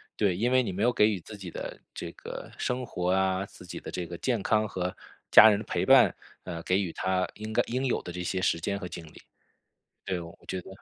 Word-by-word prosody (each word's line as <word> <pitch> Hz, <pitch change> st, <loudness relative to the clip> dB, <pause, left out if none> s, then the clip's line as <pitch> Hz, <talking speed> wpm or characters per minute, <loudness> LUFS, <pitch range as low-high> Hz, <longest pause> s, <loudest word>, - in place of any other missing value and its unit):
对， 100 Hz, -4 st, +2 dB
因 120 Hz, +5 st, +1 dB
为 130 Hz, 0 st, +5 dB
你 120 Hz, -, -2 dB
没 95 Hz, +3 st, -2 dB
有 120 Hz, +1 st, +3 dB
给 105 Hz, -1 st, +5 dB
予 100 Hz, -4 st, -1 dB
自 105 Hz, +5 st, -11 dB
己 100 Hz, -3 st, -8 dB
的 -, -, -6 dB
这 -, -, -6 dB
个 -, -, -8 dB
生 125 Hz, 0 st, -1 dB
活 90 Hz, -5 st, -1 dB
啊， 95 Hz, 0 st, +2 dB
自 90 Hz, -, -14 dB
己 -, -, -7 dB
的 -, -, -8 dB
这 90 Hz, -, -4 dB
个 85 Hz, -, -7 dB
健 115 Hz, 0 st, 0 dB
康 110 Hz, 0 st, +2 dB
和 90 Hz, -2 st, -3 dB, 0.4 s
家 110 Hz, -, +10 dB
人 105 Hz, -, +3 dB
的 105 Hz, -, -6 dB
陪 -, -, -1 dB
伴， -, -, +7 dB, 0.3 s
呃， 85 Hz, -2 st, -5 dB
给 90 Hz, +3 st, +1 dB
予 90 Hz, -5 st, -2 dB
它 95 Hz, 0 st, 0 dB
应 110 Hz, +1 st, -7 dB
该 110 Hz, -, +3 dB
应 125 Hz, +3 st, -2 dB
有 125 Hz, -, +1 dB
的 -, -, -6 dB
这 90 Hz, -, -4 dB
些 95 Hz, +1 st, -1 dB
时 90 Hz, -2 st, +1 dB
间 100 Hz, +4 st, -2 dB
和 95 Hz, -2 st, -6 dB
精 85 Hz, -1 st, -8 dB
力。 75 Hz, -, -14 dB, 0.9 s
对， 95 Hz, -, -2 dB
我 85 Hz, 0 st, -10 dB
觉 95 Hz, -, -2 dB
得 90 Hz, -, -14 dB
95 Hz, 270 characters per minute, -28 LUFS, 90-110 Hz, 0.9 s, 家